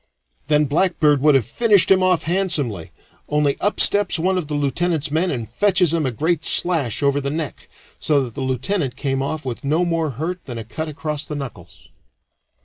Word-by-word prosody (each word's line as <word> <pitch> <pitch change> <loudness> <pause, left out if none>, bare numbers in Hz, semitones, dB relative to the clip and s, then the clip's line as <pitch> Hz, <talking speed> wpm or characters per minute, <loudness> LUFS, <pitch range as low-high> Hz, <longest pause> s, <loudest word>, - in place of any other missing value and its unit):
Then 150 0 +3
Blackbeard 150 -2 +2
would 150 -1 +5
have 130 -5 +2
finished 205 - +3
him 190 -1 +5
off 185 -3 +2
handsomely, 155 - -1 0.4
only 150 -1 +1
up 205 - -1
steps 205 -3 +3
one 185 +3 0
of 180 -5 -2
the 150 - -3
lieutenant's 145 +2 -1
men 165 +4 +1
and 120 -8 -3
fetches 180 - +2
him 160 -4 0
a - - -1
great 160 +6 -1
slash 155 - +2
over 140 0 +2
the 140 - -2
neck, 155 -4 -5 0.3
so 145 -2 +2
that 120 -3 -7
the - - -6
lieutenant 130 - -2
came 135 -1 -2
off 150 +2 -4
with 125 -3 -5
no 155 +6 +1
more 165 -2 -1
hurt 175 +4 -4
than 120 -4 -6
a 115 - -5
cut 155 +8 -5
across 150 -1 -4
the 150 - -6
knuckles. 135 -5 -9
150 Hz, 195 wpm, -20 LUFS, 135-175 Hz, 0.4 s, would